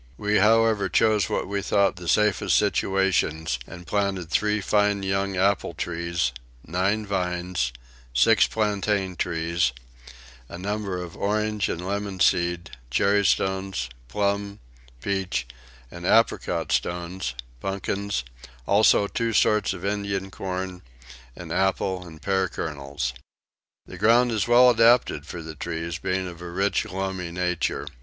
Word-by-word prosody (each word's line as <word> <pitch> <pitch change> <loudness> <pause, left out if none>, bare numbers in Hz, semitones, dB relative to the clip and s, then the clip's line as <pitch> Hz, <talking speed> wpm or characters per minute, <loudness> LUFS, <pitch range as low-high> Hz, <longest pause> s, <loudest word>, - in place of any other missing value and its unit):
We 105 0 +1
however 110 -1 +4
chose 110 -3 +3
what - - -1
we 100 0 -2
thought 100 -1 +2
the 90 -1 -8
safest 105 +1 +3
situations, 85 -7 +1
and 85 +1 -10
planted 95 -2 -1
three 105 0 +2
fine 105 0 +1
young 95 0 -1
apple 95 -3 +1
trees, 85 -4 -1 0.3
nine 95 +6 0
vines, 90 -8 -1 0.4
six - - +5
plantain 105 -3 0
trees, 85 -4 0 0.8
a - - -7
number 100 0 -3
of 90 -1 -7
orange 105 0 0
and 90 +2 -4
lemon 100 -1 -3
seed, 85 -1 +2 0.2
cherry 100 +10 +3
stones, 95 -10 0 0.2
plum, 100 +5 -1 0.4
peach, 95 -10 -1 0.5
and 85 - -9
apricot 115 +5 +2
stones, 85 -6 -2 0.2
pumpkins, 100 -2 -2 0.4
also 100 - +4
two 115 +2 -2
sorts 105 0 +3
of 95 -1 -6
Indian 100 -1 -2
corn, 95 -1 -4 0.5
and 85 -2 -9
apple 95 0 0
and 80 -2 -13
pear 95 -1 +1
kernels. 70 -5 -4 0.7
The 90 - -10
ground 120 +4 +4
is 110 -1 0
well 125 +1 +7
adapted 115 - +3
for 85 -1 -7
the 80 0 -7
trees, 85 +2 -4
being 95 +1 -1
of 85 -1 -9
a 90 - -6
rich 95 +2 0
loamy 95 -2 -4
nature. 90 -1 -1
95 Hz, 130 wpm, -25 LUFS, 85-100 Hz, 0.8 s, well